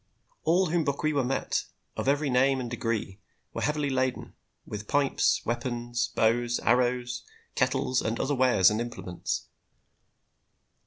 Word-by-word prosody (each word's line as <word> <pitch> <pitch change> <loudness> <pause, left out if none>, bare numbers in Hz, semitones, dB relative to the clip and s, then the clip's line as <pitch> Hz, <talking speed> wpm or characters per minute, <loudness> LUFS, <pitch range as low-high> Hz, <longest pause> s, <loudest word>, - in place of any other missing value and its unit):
All 175 +1 +3
whom 170 -1 +2
Bokwewa 140 0 0
met, 130 +2 -1 0.3
of - - -3
every 145 0 +2
name 135 +2 +3
and 120 -2 -5
degree, 115 -4 -2 0.3
were - - -4
heavily 150 -1 0
laden 130 -1 -1 0.3
with 105 0 -7
pipes, 145 -1 +2
weapons, 120 0 -2
bows, 120 +1 +2
arrows, 125 0 +1 0.3
kettles 130 0 +1
and 110 +1 -2
other 145 - 0
wares 125 -8 +5
and 110 +2 -1
implements. 120 -7 -4
125 Hz, 125 wpm, -28 LUFS, 120-140 Hz, 0.3 s, wares